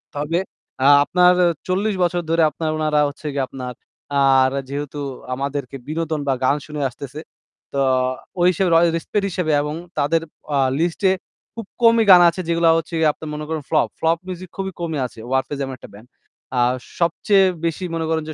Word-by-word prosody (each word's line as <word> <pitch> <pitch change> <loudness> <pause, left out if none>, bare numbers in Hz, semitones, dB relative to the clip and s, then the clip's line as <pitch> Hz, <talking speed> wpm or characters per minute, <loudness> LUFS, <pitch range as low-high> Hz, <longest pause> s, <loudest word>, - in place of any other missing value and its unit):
তবে 150 +4 -1 0.4
আ - - +3 0.2
আপনার 180 +3 +4 0.3
৪০ 195 +3 0
বছর 175 0 0
ধরে 165 0 +2
আপনার 160 0 -4
উনারা 155 -1 +1
হচ্ছে 150 +1 -9
গিয়ে 135 -2 0
আপনার 125 -2 -7 0.5
আর 135 -1 +5 0.2
যেহেতু 145 +1 -5 0.3
আমাদেরকে 140 0 -4
বিনোদন 160 0 -2
বা 135 - +3
গান 140 - +3
শুনিয়ে 150 -3 -2
আসতেছে, 140 +4 -9 0.5
তো - - -3 0.6
ওই 175 - +4
হিসেবে 185 +1 0
র - - +6 0.2
respect 200 +5 -2
এর - - 0
হিসেবে 170 -3 -1
এবং 150 +1 -3 0.2
তাদের 150 +3 +2 0.3
আ - - +2 0.2
list-এ 175 +3 +1 0.4
খুব 230 -3 -6 0.2
কমই 230 -1 +5
গান 180 -1 +9
আছে 185 +3 -4
যেগুলা 165 0 +3
হচ্ছে 165 +1 -5
গিয়ে 155 -1 +4
আপনি 160 - -11
মনে 150 0 -5
করেন 160 -2 -2
flop। 155 - +3
Flop 165 +1 +2
music 185 -1 -7
খুবই 190 0 -3
কমই 160 -4 -2
আছে 115 - -10
'Warfaze' 135 +1 -1
এমন 135 - -6
একটা - - -13
band. 110 +4 -14 0.5
আর 125 +1 +3 0.3
সবচেয়ে 190 +3 +3 0.2
বেশি 165 +3 -2
মনে 165 -1 -2
করেন 160 -1 0
যে - - -4
160 Hz, 185 wpm, -21 LUFS, 145-175 Hz, 0.6 s, গান